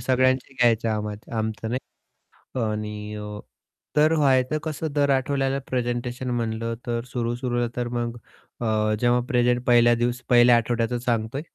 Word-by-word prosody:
सगळ्यांचे 130 +1 +1
घ्यायचं 115 -3 +3
आम्हा 105 -1 -2 0.2
आमचं 110 0 -3 0.7
नाही 125 - -6
आणि 105 -1 -4
अ, 105 0 -6 0.6
तर 155 +2 +4
व्हायचं 135 -1 +3
कसं 155 0 -3
दर 145 -1 +2
आठवड्याला 135 0 +1
प्रेझेंटेशन 125 0 -2
म्हणलं 115 -1 -2
तर 115 0 -1
सुरू, 120 -1 -2
सुरूला 120 -1 -1
तर 120 -1 -2
मग 120 0 -3 0.4
अ, 110 -2 +1
जेव्हा 120 +1 +3
प्रेझेंट 125 -1 +2
पहिल्या 120 -1 +5
दिवस 120 +1 -1
पहिल्या 120 0 +7
आठवड्याचं 120 +1 0
सांगतोय. 120 +2 -1
120 Hz, 140 wpm, -24 LUFS, 115-130 Hz, 0.7 s, पहिल्या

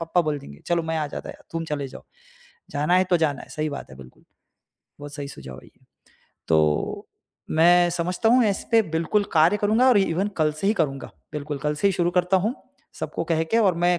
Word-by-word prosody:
पप्पा 165 +2 +1
बोल 155 -3 -1
देंगे, 70 - -13
चलो 170 -1 +1
मैं 160 0 -2
आ 155 - -1
जाता - - -7
है - - -13 0.2
तुम 165 0 -3
चले 150 -3 -3
जाओ। 130 - -12 0.7
जाना 150 +4 +1
है 185 - +4
तो 180 - +5
जाना 155 -4 0
है, - - -13
सही 155 -1 -3
बात 140 - -7
है 65 - -12
बिल्कुल, 65 -1 -15 0.8
बहुत 145 0 -9
सही 145 -1 -5
सुझाव 65 - -10
है - - -18
ये। - - -25 0.7
तो 75 -2 +1 0.4
मैं 175 +2 +5
समझता 175 +5 0
हूँ 245 +1 +5
इस 200 -2 -1
पे 230 - +6
बिल्कुल 170 +6 +1
कार्य 165 +5 +4
करूँगा 215 +5 +3
और 245 -5 +5
ईवन 190 +1 +1
कल 155 -2 +2
से - - -1
ही 205 - +4
करूँगा, 135 -3 -2 0.2
बिल्कुल 150 -1 -4
कल 150 +2 -1
से 200 +7 +2
ही - - +1
शुरू 175 -1 +1
करता 180 +1 +2
हूँ, 210 +7 0 0.5
सबको - - -3
कह 160 -1 +1
के 225 +8 +1
और 195 -6 +3
मैं 175 0 +3
165 Hz, 225 wpm, -24 LUFS, 145-185 Hz, 0.8 s, पे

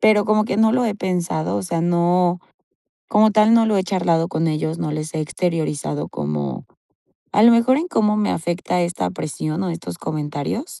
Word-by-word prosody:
pero 215 -2 +4
como 215 0 +2
que 210 - -2
no 220 0 +4
lo 250 0 +2
he 215 -3 -1
pensado, 175 - -2
o 100 - -2
sea, 165 - -2
no, 175 +1 +2 0.7
como 215 0 +4
tal, 215 +1 +4
no 230 -1 +5
lo 215 -2 +1
he 190 - +2
charlado 170 -3 0
con 165 -3 -1
ellos, 155 +1 -2
no 150 -3 -3
les 155 +1 -4
he 160 - -1
exteriorizado 155 -3 -2
como, 75 -3 -4 0.7
a 210 - +4
lo 235 - +8
mejor 235 +3 +4
en 325 +5 -1
cómo 215 -10 +1
me 210 -1 +1
afecta 175 +1 -2
esta 170 - -1
presión 155 - -4
o 185 - -2
estos 90 - -6
comentarios. 150 - -4
175 Hz, 195 wpm, -20 LUFS, 155-210 Hz, 0.7 s, lo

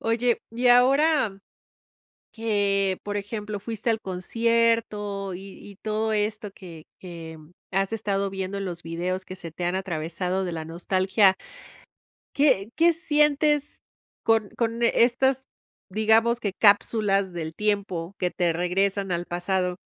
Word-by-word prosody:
Oye, 230 +1 +1
y 240 +2 -1
ahora, 260 -3 +4 0.9
que, 200 -4 +1
por 205 0 -3
ejemplo, 210 0 -5
fuiste 225 +2 -2
al 225 -1 0
concierto, 210 0 0
y 195 +1 -10
y 200 - -13
todo 220 +1 -2
esto 210 0 -2
que 170 -5 -12
que 165 -3 -9 0.3
has 195 +3 0
estado 200 -2 -1
viendo 190 0 -4
en 195 - -3
los 175 -2 -5
videos 180 +3 -3
que 185 - -8
se 170 -2 -7
te 175 - -5
han 175 +1 0
atravesado 180 +1 -2
de 175 - -3
la 160 -1 -4
nostalgia 190 +4 +2 1.0
¿qué 245 -8 +3
qué 335 +1 +5
sientes 295 -2 +2 0.4
con 225 -2 +2
con 230 0 -1
estas, 265 +3 +2 0.4
digamos, 220 +3 +3
que 205 -5 -2
cápsulas 200 -2 +3
del 160 -2 -5
tiempo 200 -4 -2
que 180 -1 0
te 175 -3 0
regresan 190 +3 0
al 175 0 -1
pasado? 180 +1 -1
200 Hz, 135 wpm, -25 LUFS, 185-225 Hz, 1.0 s, qué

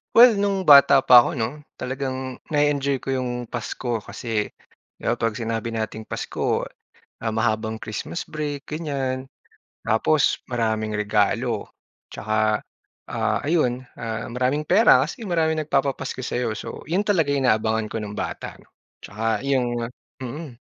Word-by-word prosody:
well 230 -3 +8
no'ng 200 -1 +1
bata 140 -3 +8
pa 125 - +9
ako 145 +6 +1
'no, 125 +5 -3 0.2
talagang 130 0 -4
na-e-enjoy 145 -2 +2
ko 135 - -2
'yong 125 -2 -2
Pasko 120 0 -3
kasi 110 0 -3 0.5
'di - - -22
ba - - 0
'pag 115 -2 0
sinabi 115 0 -3
nating 110 0 -4
Pasko, - - -2 0.6
ah, 110 - 0
mahabang 110 0 0
Christmas 110 +11 -5
break 145 -2 -4
ganyan. 135 -4 -3 0.5
Tapos 135 +7 +2
maraming 110 -3 -1
regalo 105 -1 +1 0.5
tsaka, 110 0 0 0.5
ah, - - 0
ayon, 135 -6 +1 0.2
ah, 115 0 -4
maraming 130 +4 0
pera 155 - +5
kasi 160 - -4
maraming 160 -4 +1
nagpapapasko 135 -3 -1
sa'yo. 120 -2 -1
So, 110 - -7
'yon 175 +6 +1
talaga 170 -9 +2
inaabangan 110 -5 +1
ko - - -4
no'ng 105 -1 -5
bata - - -5
'no. - - -24 0.3
Tsaka 110 +2 -2
'yong 120 -3 0 0.3
mm. 130 0 -7
125 Hz, 135 wpm, -23 LUFS, 110-145 Hz, 0.6 s, pa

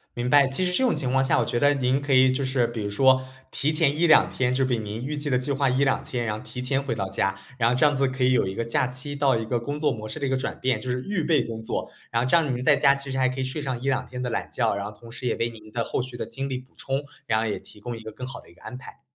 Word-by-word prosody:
明 120 +1 -2
白。 140 0 +6
其 135 +8 -1
实 180 - 0
这 260 - +1
种 250 - +3
情 130 -4 -2
况 130 0 +3
下， - - +2
我 - - +1
觉 120 - -1
得 145 0 +5
您 130 0 +1
可 145 -1 -3
以 130 0 +6
就 135 +1 -1
是 130 -2 +1
比 115 -2 -5
如 100 - -2
说 130 +5 +4 0.3
提 150 +3 0
前 155 -2 +2
1、2 165 0 +5
天 125 -1 0
就 135 +1 +2
比 125 -2 +1
您 110 +2 -5
预 150 +2 -3
计 145 0 -3
的 125 - +3
计 130 +3 -2
划 140 -1 +2
1、2 135 +1 +2
天， 120 -2 -3
然 105 -1 -1
后 - - -10
提 125 - -7
前 135 +2 0
回 130 -5 -3
到 95 -3 -2
家。 95 +1 0 0.2
然 115 -1 +3
后 125 - +2
这 130 - +4
样 145 -1 +4
子 135 0 +2
可 130 0 -2
以 130 - +4
有 95 - +2
一 95 - -4
个 115 - -2
假 115 +2 +1
期 130 +3 -6
到 140 -3 +3
一 115 - -3
个 120 +1 0
工 145 +5 -4
作 150 -1 +2
模 110 -3 -5
式 155 - -5
的 140 - -1
一 - - 0
个 135 - +1
转 - - -4
变， 130 0 0
就 130 - -5
是 125 +1 -1
预 190 -3 -1
备 155 -2 +3
工 110 -1 -6
作。 110 - -3 0.2
然 115 0 +1
后 - - 0
这 135 - +4
样 150 -6 +2
您 125 - -4
在 - - +6
家 140 -1 +5
其 140 -1 -7
实 130 - -2
还 130 -1 +3
可 130 +1 -5
以 130 - 0
睡 130 +4 -3
上 130 -4 -3
1、2 135 -1 0
天 125 0 -6
的 125 - -2
懒 115 - -3
觉， 115 -4 +1
然 100 - -3
后 105 - -5
同 115 +2 -14
时 125 - -7
也 - - +1
为 115 +1 -1
您 110 -2 -13
的 115 0 -1
后 - - -2
续 125 -1 -7
的 - - -3
精 135 0 -5
力 130 - -2
补 130 +1 -13
充， 135 +1 -2 0.2
然 110 -1 +2
后 115 - 0
也 105 - -2
提 - - -16
供 120 +3 -5
一 - - -10
个 110 0 -8
更 125 - -7
好 130 - -7
的 - - -17
一 - - -17
个 - - -22
安 - - -7
排。 130 - -13
130 Hz, 365 characters per minute, -25 LUFS, 120-140 Hz, 0.3 s, 白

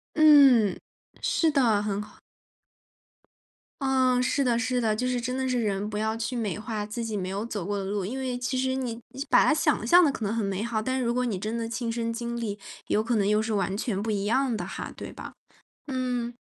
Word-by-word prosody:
嗯， 275 - +6 0.4
是 325 - +2
的， 235 -8 +3
很 205 -1 -2
好。 210 - -15 1.7
嗯， 260 -2 +3
是 265 +2 +1
的 240 -2 +2
是 245 +2 0
的， 220 -2 +1
就 250 +4 -1
是 250 -1 0
真 250 +2 -3
的 260 0 -1
是 250 -1 +1
人 205 -1 -1
不 210 - -3
要 220 +1 -1
去 230 +2 -3
美 215 -6 -2
化 210 -1 -4
自 230 +3 -4
己 220 -2 -3
没 185 -2 -3
有 200 +3 -3
走 205 -6 -4
过 205 0 -2
的 - - -3
路。 200 0 -2
因 240 +7 -4
为 260 -2 -3
其 250 +1 -2
实 260 0 0
你 250 -3 -2 0.2
是 275 +3 -4
把 - - +5
它 - - +4
想 305 -6 +1
象 350 +10 +6
得 290 - +2
可 225 - -5
能 200 - -1
很 225 -2 -1
美 195 +1 -2
好， 225 -1 -1
但 260 +3 -1
如 235 - +1
果 250 +1 0
你 225 -5 -1
真 215 +5 -3
的 230 -1 -3
亲 235 0 -3
身 230 0 -2
经 235 0 -4
历 205 -3 -4 0.3
有 215 - +1
可 230 0 0
能 200 - +2
又 210 +1 +3
是 220 0 -2
完 195 -1 0
全 205 -2 -2
不 220 - -4
一 200 -1 -1
样 255 +2 +1
的 - - -4
哈， - - -6
对 - - -7
吧？ - - -9 0.6
嗯。 250 -3 -2
230 Hz, 255 characters per minute, -27 LUFS, 210-255 Hz, 1.7 s, 嗯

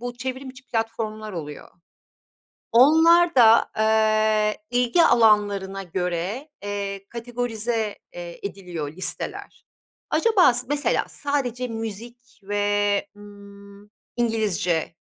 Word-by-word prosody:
bu 245 0 -6
çevrim 260 +1 -5
içi 255 -1 -16
platformlar 220 -2 -3
oluyor. 150 -4 -7 1.0
Onlarda, 305 -2 +6
eee, 215 -1 +2
ilgi 245 +7 +3
alanlarına 205 -6 +3
göre, 180 - -3
eee, 200 -1 -4
kategorize, 235 -2 -3 0.2
eee, 175 -1 -8
ediliyor 175 -7 -7
listeler. 185 +1 -5 0.5
Acaba 430 - +4
s 245 +1 -3
mesela 290 0 +1
sadece 255 -4 -2
müzik 230 +1 -8
ve, 205 0 0
ımm, 200 0 -15 0.3
İngilizce, 205 -9 0
220 Hz, 90 wpm, -23 LUFS, 200-245 Hz, 1.0 s, Onlarda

